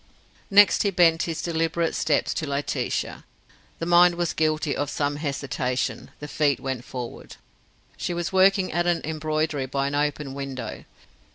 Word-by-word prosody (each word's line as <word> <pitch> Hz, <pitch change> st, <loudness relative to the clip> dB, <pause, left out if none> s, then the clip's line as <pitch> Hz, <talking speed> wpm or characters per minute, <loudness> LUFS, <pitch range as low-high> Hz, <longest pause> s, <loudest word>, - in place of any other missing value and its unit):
Next 205 Hz, 0 st, +6 dB
he 205 Hz, -, +2 dB
bent 170 Hz, -3 st, +4 dB
his 165 Hz, -, -4 dB
deliberate 165 Hz, 0 st, 0 dB
steps 155 Hz, -2 st, +1 dB
to 155 Hz, -, -3 dB
Laetitia. 140 Hz, +1 st, -2 dB, 0.5 s
The 165 Hz, -, -4 dB
mind 175 Hz, 0 st, +5 dB
was 175 Hz, -1 st, -1 dB
guilty 155 Hz, -2 st, 0 dB
of 145 Hz, 0 st, -2 dB
some 145 Hz, 0 st, -1 dB
hesitation; 135 Hz, -4 st, -2 dB
the 150 Hz, -, -7 dB
feet 145 Hz, -1 st, +1 dB
went 130 Hz, -3 st, -4 dB
forward. 125 Hz, -2 st, -8 dB, 0.6 s
She 175 Hz, -, -3 dB
was 175 Hz, +1 st, -3 dB
working 190 Hz, 0 st, +4 dB
at 175 Hz, +2 st, 0 dB
an 175 Hz, -1 st, +1 dB
embroidery 155 Hz, -2 st, -2 dB
by 135 Hz, +1 st, -1 dB
an 140 Hz, -, -2 dB
open 145 Hz, -1 st, -1 dB
window. 135 Hz, -2 st, -6 dB
155 Hz, 155 wpm, -25 LUFS, 140-170 Hz, 0.6 s, Next